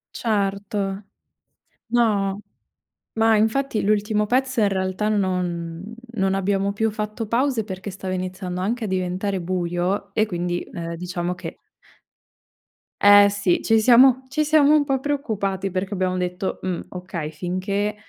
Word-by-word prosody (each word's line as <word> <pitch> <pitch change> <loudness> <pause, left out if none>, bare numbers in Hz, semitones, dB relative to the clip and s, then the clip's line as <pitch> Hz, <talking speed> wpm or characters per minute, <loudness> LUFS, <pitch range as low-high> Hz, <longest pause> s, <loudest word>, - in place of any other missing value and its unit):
Certo. 200 -2 -1 0.9
No, 205 -4 +1 0.7
ma 225 0 +3
infatti 225 +2 +1
l'ultimo 210 +1 +1
pezzo 260 +2 0
in 205 - +4
realtà 190 +2 -1
non 180 -1 -2 0.2
non 195 0 +1
abbiamo 195 +1 0
più 220 +2 0
fatto 215 +1 -4
pause 240 0 +1
perché 190 0 -6
stava 190 0 -5
iniziando 185 0 -4
anche 230 +5 -1
a - - -3
diventare 185 +1 -2
buio, 175 +2 -2
e 215 - +2
quindi, 175 -3 -2
ehm, 170 0 -6
diciamo 180 0 -3
che - - -8 1.4
Eh 205 0 +8
sì, 200 -3 +1
ci 225 -1 +3
siamo 255 +3 +6
ci 290 +4 0
siamo 300 -1 +5
un 300 - +4
po' 270 -2 0
preoccupati 205 -9 -2
perché 190 +2 -3
abbiamo 185 -1 -1
detto: 180 +1 -2
"Mhmm, 185 -2 -2
okay", 180 -4 -5
finché, 185 +6 -2
200 Hz, 135 wpm, -23 LUFS, 185-220 Hz, 1.4 s, Eh